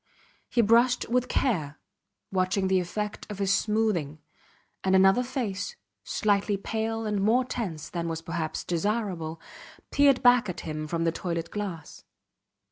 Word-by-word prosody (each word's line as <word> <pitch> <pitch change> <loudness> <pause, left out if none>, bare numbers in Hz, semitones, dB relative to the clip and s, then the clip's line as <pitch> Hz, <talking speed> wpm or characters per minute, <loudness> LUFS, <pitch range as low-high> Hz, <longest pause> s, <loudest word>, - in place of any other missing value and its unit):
He 240 - +3
brushed 235 +3 +4
with 250 +1 +1
care, 160 - 0 0.5
watching 190 0 +1
the 190 -1 +4
effect 210 +5 -4
of 210 - -6
his 195 -1 +2
smoothing; 210 -9 0 0.7
and 190 0 +3
another 195 +5 +5
face, 250 - -3 0.3
slightly 205 -1 +1
pale 225 +2 -2
and 210 -2 0
more 235 +5 +3
tense 180 -12 -4
than 170 0 -3
was 165 -1 -4
perhaps 165 -2 -3
desirable, 175 -3 -2 0.5
peered 280 -2 +4
back 245 -4 +5
at 180 - -5
him 155 -1 -4
from 165 +1 -1
the 165 - +2
toilet 170 -1 -4
glass. 190 -7 -6
195 Hz, 140 wpm, -27 LUFS, 170-225 Hz, 0.7 s, another